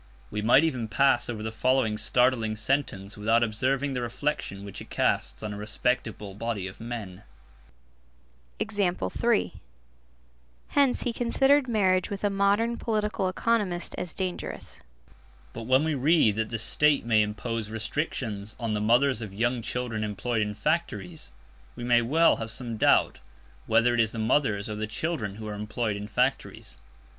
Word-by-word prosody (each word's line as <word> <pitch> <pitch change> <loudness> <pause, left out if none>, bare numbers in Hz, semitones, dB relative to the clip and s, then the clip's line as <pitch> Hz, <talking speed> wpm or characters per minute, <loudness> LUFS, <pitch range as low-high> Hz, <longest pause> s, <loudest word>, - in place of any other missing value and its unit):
We 105 - -2
might 120 +7 +5
even 130 -8 -1
pass 120 +2 +2
over 110 -3 -4
the 110 - -3
following 125 -1 +1
startling 115 0 +2
sentence 110 -4 -2
without 115 +3 +2
observing 130 +5 0
the 125 - -2
reflection 120 -5 -3
which 100 - -7
it - - -11
casts - - 0
on 105 -1 -3
a - - -7
respectable 105 -1 -2
body 105 -2 -3
of 95 - -8
men: 110 -5 -6 1.4
Hence 65 - -2
he 240 - -1
considered 270 +4 +3
marriage 190 -5 +2
with 200 0 -5
a 205 - +2
modern 200 +4 +2
political 210 -4 -1
economist 190 -3 -1
as 180 -3 -6
dangerous. 185 -2 -5 0.7
But 115 - -7
when 130 +3 +4
we 160 0 0
read 145 -4 +3
that 110 0 -1
"the 115 - -2
State 145 +4 +3
may 110 -2 +4
impose 110 +1 -3
restrictions 110 -3 -3
on 115 -3 -2
the 105 - -1
mothers 120 +3 +3
of 100 -3 -7
young 120 +3 0
children 115 -2 -3
employed 110 +2 -2
in 105 0 -2
factories," 160 - -2 0.4
we - - -7
may 120 0 +4
well 160 +8 +4
have 115 0 -5
some 120 0 -4
doubt 110 - +3 0.5
whether 120 +1 +4
it 120 - 0
is 110 -1 +2
the - - -6
mothers 110 -3 +1
or 110 - -4
the 105 +1 -3
children 110 -4 -3
who 110 0 -7
are 105 - -4
employed 105 +1 -2
in 100 0 -6
factories. 120 - -2
120 Hz, 155 wpm, -27 LUFS, 105-150 Hz, 1.4 s, might